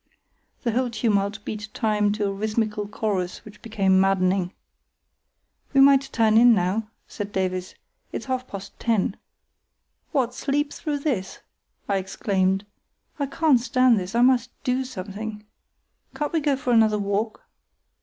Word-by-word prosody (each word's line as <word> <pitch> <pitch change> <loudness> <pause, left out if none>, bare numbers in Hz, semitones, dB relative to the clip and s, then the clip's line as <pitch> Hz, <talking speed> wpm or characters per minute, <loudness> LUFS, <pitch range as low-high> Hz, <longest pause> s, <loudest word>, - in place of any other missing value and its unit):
The 235 - +1
whole 250 +2 0
tumult 210 -2 0
beat 210 -1 -5
time 210 -2 +1
to 210 0 -1
a 200 - 0
rhythmical 215 0 -1
chorus 200 -4 -3
which 215 - -13
became 195 -4 +2
maddening. 190 -1 +2 1.2
"We 275 - +6
might 275 0 +5
turn 220 -1 +4
in 240 -1 +7
now," 205 +4 -1 0.2
said 205 -1 -6
Davies; 185 -2 -2 0.4
"it's - - -5
half 255 -1 -2
past 200 0 -9
ten." 220 -4 +1 1.0
"What, 255 -5 +1
sleep 285 +3 -1
through 290 -2 -3
this?" 220 -11 -2 0.5
I 200 - +1
exclaimed. 190 0 0 0.5
"I 280 - 0
can't 290 -2 +3
stand 245 -1 +3
this, 185 +4 -6
I 240 - +4
must 250 -1 +3
do 260 0 0
something. 210 -1 -7 0.7
Can't 295 +1 -3
we 325 - +3
go 290 -2 +1
for 255 -2 -1
another 220 -2 +4
walk?" 205 +2 -2
215 Hz, 145 wpm, -24 LUFS, 200-250 Hz, 1.2 s, in